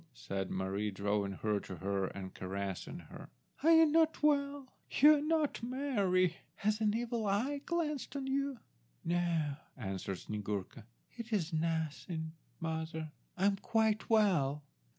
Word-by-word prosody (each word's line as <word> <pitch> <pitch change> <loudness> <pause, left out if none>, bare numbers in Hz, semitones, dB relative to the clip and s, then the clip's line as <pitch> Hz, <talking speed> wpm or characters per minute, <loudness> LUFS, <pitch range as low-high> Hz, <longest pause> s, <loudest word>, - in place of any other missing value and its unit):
said 95 -4 -3
Mary, 95 +3 -1
drawing 100 0 -1
her 105 +2 0
to 95 - -8
her 95 +2 -1
and 95 -1 -7
caressing 95 0 -4
her. - - -11 0.3
"Are 315 - +4
you 325 0 +8
not 320 0 +3
well? 280 -2 +1 0.2
You 300 +2 +7
are - - -2
not 310 -1 +1
merry. 205 -9 +1 0.2
Has 215 +2 0
an 210 -1 +3
evil 235 -2 -1
eye 255 +9 0
glanced 305 -6 -1
on 275 -1 -2
you?" 275 0 0 0.5
"No," 170 -4 +1 0.2
answered 95 -4 -3
Snyegurka; 105 +1 -4 0.3
"it 235 -1 -7
is 175 -6 0
nothing, 160 0 -1 0.3
mother. 160 -1 -3 0.3
I 190 - +2
am 200 -1 +3
quite 220 +1 +1
well." 170 -11 +3
180 Hz, 140 wpm, -34 LUFS, -, 0.5 s, you